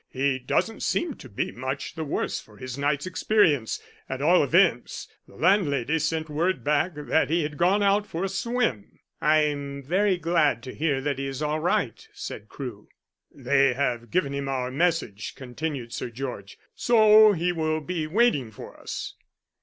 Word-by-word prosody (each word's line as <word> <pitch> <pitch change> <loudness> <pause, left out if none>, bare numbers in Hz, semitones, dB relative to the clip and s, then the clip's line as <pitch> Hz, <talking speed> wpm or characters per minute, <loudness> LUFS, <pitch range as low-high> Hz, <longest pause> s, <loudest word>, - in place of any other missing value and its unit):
"He 130 0 0
doesn't 220 - -1
seem 335 -4 0
to - - -12
be 100 - -3
much 130 +3 -4
the 160 - -4
worse 145 - -2
for 105 -1 -17
his 130 -1 -6
night's 140 +2 0
experience. 180 - +2 0.3
At 130 - -3
all 165 +5 +4
events, 160 -3 +2 0.2
the - - -17
landlady 160 - +2
sent 160 +1 -1
word 160 -1 -1
back 150 +6 +1
that 150 +1 +1
he 165 +1 +2
had 150 0 -4
gone 185 +6 +3
out 200 +1 +2
for 170 -3 -4
a - - +1
swim." 195 - -2 0.2
"I 155 +1 +4
am 140 -2 -3
very 185 +6 +2
glad 165 -8 +1
to 130 - -7
hear 145 -3 0
that 140 -1 -2
he 135 - -2
is 135 +2 -4
all 150 +1 0
right," 170 +3 -1
said 105 0 -7
Crewe. 120 -7 -8 0.4
"They 135 0 +2
have 120 -4 -1
given 140 -3 0
him 140 0 -3
our 130 -2 -2
message," 145 - -1
continued 130 -1 -5
Sir - - -4
George, 120 -5 -7 0.2
"so 215 -2 +6
he 175 0 0
will 155 -2 -1
be 160 0 -3
waiting 165 - +2
for 110 - -11
us." - - -5
150 Hz, 175 wpm, -26 LUFS, 130-175 Hz, 0.4 s, so